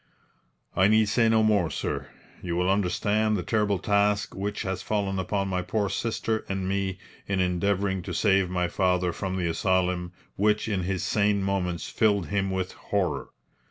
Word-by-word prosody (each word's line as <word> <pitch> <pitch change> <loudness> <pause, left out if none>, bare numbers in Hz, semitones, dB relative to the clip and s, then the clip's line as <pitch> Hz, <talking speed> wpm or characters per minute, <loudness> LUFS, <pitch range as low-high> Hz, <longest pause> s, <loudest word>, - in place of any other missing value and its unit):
"I 95 - +5
need 110 0 +4
say 115 +2 +3
no 110 -1 +4
more, 105 -6 +3
sir. - - -3 0.3
You 85 -2 -3
will 90 +2 +2
understand 105 +3 +1
the 90 - -3
terrible 105 -1 +1
task 100 +1 +1
which 100 +2 -3
has 95 -2 -3
fallen 100 -2 -1
upon 95 +1 -1
my 90 -1 -1
poor 100 +2 -1
sister 110 0 -1
and 95 -1 -2
me 95 -1 -1 0.3
in 95 -1 0
endeavouring 95 +1 0
to - - -3
save 95 -3 +3
my 90 -1 0
father 90 -1 +1
from 95 -2 -3
the 90 - -1
asylum 90 +1 0 0.3
which 105 +2 +2
in 100 -4 0
his 95 -1 -2
sane 100 -1 +1
moments 90 -4 -1
filled 100 -4 +1
him 95 -1 0
with 95 -1 -2
horror. 90 -9 -2
95 Hz, 170 wpm, -26 LUFS, 90-105 Hz, 0.3 s, I